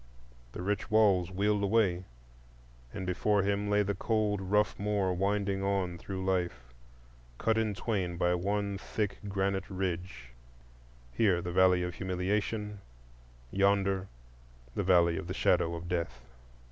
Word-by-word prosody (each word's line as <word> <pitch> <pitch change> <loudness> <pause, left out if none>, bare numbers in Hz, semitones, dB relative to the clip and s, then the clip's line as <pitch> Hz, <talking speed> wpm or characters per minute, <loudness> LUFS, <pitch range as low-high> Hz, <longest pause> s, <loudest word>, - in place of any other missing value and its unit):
The - - -5
rich 100 +1 -2
walls 100 -5 +4
wheeled 100 +2 +1
away, 100 -3 +2 0.9
and 95 - -5
before 100 +2 +1
him 100 +1 0
lay 105 0 +3
the 100 0 -1
cold 105 0 0
rough 105 +2 +1
moor 100 -2 0
winding 100 +1 0
on 95 -3 -1
through 95 +1 -5
life, 85 -11 -2 0.6
cut 110 - +1
in 110 -2 0
twain 95 -5 -2
by 90 0 +2
one 100 +2 -1
thick 105 -1 -3
granite 95 0 -1
ridge,—here, - - -4
the 90 -1 -4
Valley 90 -1 +4
of 90 0 -3
Humiliation; 100 +3 -2 0.7
yonder, 100 -1 +2 0.7
the - - -1
Valley 85 -2 +4
of - - -7
the 90 - -4
Shadow 85 -3 +2
of 85 +1 -7
Death. 85 -1 -3
95 Hz, 135 wpm, -31 LUFS, 90-100 Hz, 0.9 s, walls